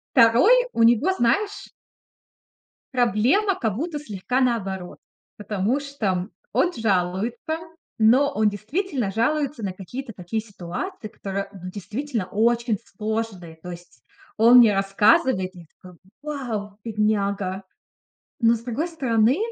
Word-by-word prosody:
2, 240 - +6 0.2
у 230 - +2
него, 240 +10 +4
знаешь 405 - 0 1.3
проблема 250 - +2
как 220 - -2
будто 310 +3 -3
слегка 250 -1 -2
наоборот. 195 -8 -1 0.4
Потому 210 +5 -1
что 210 -10 -2 0.2
он 355 - +2
жалуется, 220 - -1 0.4
но 260 +6 +4
он 215 0 +2
действительно 245 - -2
жалуется 275 +3 0
на 190 -2 -2
какие-то 225 +7 -7
такие 185 +5 -3
ситуации, 215 - -6
которые 195 -1 -5
ну 185 -2 -8
действительно 215 +3 -4
очень 230 +2 +1
сложные. 210 -6 -4
То 180 - -7
есть 170 -8 -12 0.3
он 235 +3 +7
мне 220 -4 +7
рассказывает, 195 - +2
я 175 -2 -12 0.2
такая: 180 -2 -14 0.2
"Вау, 230 -9 -5
бедняга!" 200 -3 -1 0.8
Но, 230 -1 +5
с 225 - -5
другой 250 +8 -3
стороны, 255 -5 +2
225 Hz, 120 wpm, -23 LUFS, 195-260 Hz, 1.3 s, он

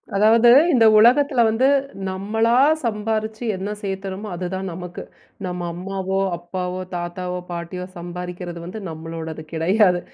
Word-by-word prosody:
அதாவது, 225 +3 +5 0.2
இந்த 230 -3 +5
உலகத்துல 255 +3 +5
வந்து 225 +4 +2 0.4
நம்மளா 220 +5 0 0.3
சம்பாரிச்சு 220 0 -2
என்ன 190 +2 -4
சேர்த்துறமோ 195 +1 -4
அது 180 +1 -4
தான் 190 0 -3
நமக்கு. 180 0 -7 0.4
நம்ம 180 -1 -4
அம்மாவோ, 190 +1 -3 0.2
அப்பாவோ, 180 +1 -4
தாத்தாவோ, 180 +1 -4
பாட்டியோ 175 +1 -5
சம்பாரிக்கிறது 175 0 -6
வந்து 195 +5 -7
நம்மளோடது 160 0 -6
கெடையாது. 180 +3 +3
190 Hz, 120 wpm, -22 LUFS, 175-215 Hz, 0.4 s, அதாவது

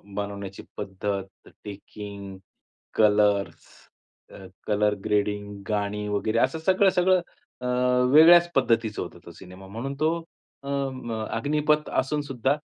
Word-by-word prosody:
बनवण्याची 100 -1 -5
पद्धत, 95 -1 -5 0.2
taking, 100 -1 -9 0.6
colours, 105 -2 +2 0.7
अ, 95 - -11 0.2
colour 105 0 +2
grading, 105 -1 -1
गाणी 105 0 -2
वगैरे 110 +2 0
असं 135 +5 +1
सगळं-सगळं 185 -1 +4 0.4
अ, - - -5 0.5
वेगळ्याच 170 +3 +8
पद्धतीचं 115 -4 +1
होतं. 85 - -8
तो 85 - -10
सिनेमा 95 +2 -13
म्हणून 120 +7 -5
तो 155 - +4 0.5
अ, 140 - -10 0.3
म 115 -4 -5
अग्निपथ 150 +5 +1
असूनसुद्धा 135 -1 -1
105 Hz, 110 wpm, -25 LUFS, 100-140 Hz, 0.7 s, वेगळ्याच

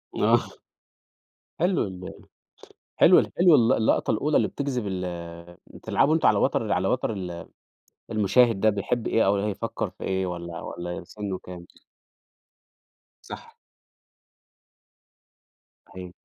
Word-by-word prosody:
آه، - - +3 1.2
حلو 180 +1 +2
ال 90 -1 -8 0.8
حلو - - +6
حلو 175 -3 +6
ال 120 +2 +4
اللقطة 110 - +1
الأولى 145 +8 +1
اللي - - +2
بتجذب 125 -6 -3
ال 90 -1 -3 0.6
بتلعبوا 155 +3 0
أنتم 160 - +2
على - - +4
وتر - - 0
على - - +1
وتر 110 - -1
ال 90 -3 -7 0.6
المُشاهد 110 0 +3
ده 110 - +4
بيحب 110 +3 -2
إيه 115 - +2
أو 100 - +3
هيفكر 105 +2 -3
في - - -12
إيه 95 0 -1
والَّا 85 -1 -6
والَّا 85 0 -6
سنُّه 100 -1 -6
كام. 90 -1 -11 1.6
صح. - - -11 2.3
صحيح. 90 -1 -10
100 Hz, 120 wpm, -25 LUFS, 90-120 Hz, 2.3 s, حلو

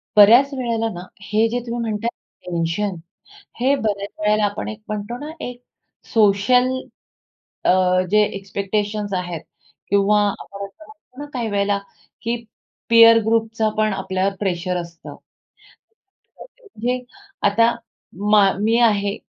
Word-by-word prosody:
बऱ्याच 240 +7 +7
वेळेला 230 -3 -1
ना, 175 - -7 0.2
हे 215 +3 +1
जे 245 +2 -1
तुम्ही 235 0 -4
म्हणता 215 +2 -2
आहे, 180 - -15
टेन्शन, 170 +4 -1 0.6
हे 270 +3 +3
बऱ्याच 205 -5 -2
वेळेला 210 0 +2
आपण 205 - -3
एक 215 0 -8
म्हणतो 215 +3 -4
ना, 310 - -6
एक 245 0 -8 0.5
सोशल 225 +4 +4 0.9
अ, - - +4 0.4
जे 210 - +5 0.2
एक्स्पेक्टेशन्स 205 +1 -3
आहेत 175 -3 -3 0.5
किंवा 200 +1 +3
आपण 200 0 -7
असं 260 +11 -15
म्हणतो 285 -3 -18
ना, - - -5
काही 235 -3 -2
वेळेला 200 0 +1 0.4
की 230 +1 -1 0.5
पीअर 230 0 +8
ग्रुपचा 225 -1 +1
पण 215 -1 +2
आपल्यावर 195 0 -1
प्रेशर 180 -2 -1
असतं. 170 -1 -11 1.3
तर - - -8 0.2
म्हणजे 250 - -3 0.5
आता 230 +3 +3 0.6
मा 200 -2 +6
मी 225 +2 +2
आहे, 205 -3 +2
210 Hz, 130 wpm, -21 LUFS, 200-230 Hz, 1.3 s, पीअर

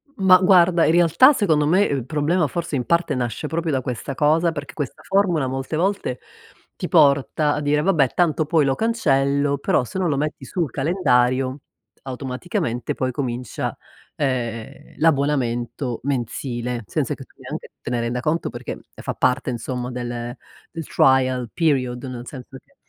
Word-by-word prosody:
M 195 - -3
mah 185 -1 +9
guarda, 180 -2 +5
in - - +4
realtà 175 - +6
secondo 160 - +2
me, 180 +6 +3
il 140 - -1
problema 155 +5 +1
forse 170 +1 -3
in 125 -3 -1
parte 170 -2 +1
nasce 125 +4 -3
proprio 165 0 -2
da 130 - 0
questa 125 +2 -4
cosa 160 +4 +3
perché 145 -5 -7
questa 145 -5 -5
formula, 190 -8 +1
molte 135 +4 -3
volte 180 -7 -1 0.6
ti - - -4
porta 145 -1 +3
a 150 - -2
dire 150 +1 +1
vabbè 155 -7 +3
tanto 160 -3 +1
poi 155 -1 +2
lo 135 -1 +1
cancello, 140 -10 +1
però 140 - +1
se 125 - -7
non 175 -3 +1
lo 140 - 0
metti 150 -1 -3
sul 165 +1 -2
calendario, 130 -3 +1 0.4
automaticamente 125 -2 -3
poi 130 0 -1
comincia, 125 -3 -4 0.4
ehm, 125 -2 -3
l'abbonamento 130 -5 0
mensile 125 -2 -3
senza - - -2
che - - -10
tu - - -24
neanche - - -7
te - - -6
ne 120 -1 -1
renda 120 +1 -2
conto 155 +6 -1
perché 120 0 -7
fa - - -5
parte 130 +1 +1
insomma 125 +1 -4
del 120 0 -5 0.4
del 165 -3 -6
trial 130 -2 +2
period, 130 -7 0
nel 125 -1 -7
senso 130 -1 -9
che - - -34
140 Hz, 165 wpm, -22 LUFS, 125-160 Hz, 0.6 s, mah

